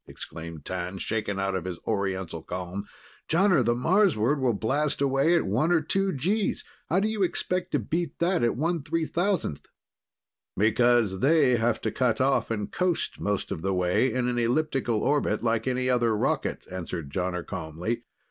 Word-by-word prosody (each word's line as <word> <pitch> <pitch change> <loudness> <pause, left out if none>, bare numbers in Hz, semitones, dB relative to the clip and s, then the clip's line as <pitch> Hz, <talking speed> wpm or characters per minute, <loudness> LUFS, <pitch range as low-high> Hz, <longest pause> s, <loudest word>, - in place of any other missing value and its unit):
exclaimed 80 -2 -9
T'an, 90 +1 -4
shaken 105 0 -2
out 95 0 0
of 95 -2 -3
his 90 -2 -4
Oriental 95 -6 -2
calm. 90 +4 -5 0.4
"Jonner, 175 -4 +4
the 120 0 +2
Marsward 150 - +2
will 125 -4 +1
blast 145 +8 0
away 140 +4 +3
at 170 - +2
one 125 - +1
or 175 - +5
two 195 +5 0
Gs. 190 +9 0 0.3
How 180 - +3
do 205 - +1
you 220 -1 -2
expect 180 0 -1
to - - +4
beat 155 +6 -2
that 175 +1 +1
at 120 -1 +2
1/3,000th?" 165 - -1 0.9
"Because 110 -1 +3
they 140 -2 +4
have 115 +1 +1
to - - -1
cut 120 -4 +1
off 135 +1 +2
and 105 -3 -3
coast 180 -2 -1
most 105 -1 -2
of - - -3
the 95 +1 0
way 90 +8 +2
in 125 -1 0
an 120 -1 0
elliptic 135 +2 0
orbit, 115 0 +1
like 115 0 0
any 130 0 0
other 120 -3 +2
rocket," - - -1
answered 85 -5 -5
Jonner 90 -1 -2
calmly. 85 +9 -4
120 Hz, 165 wpm, -27 LUFS, 100-155 Hz, 0.9 s, or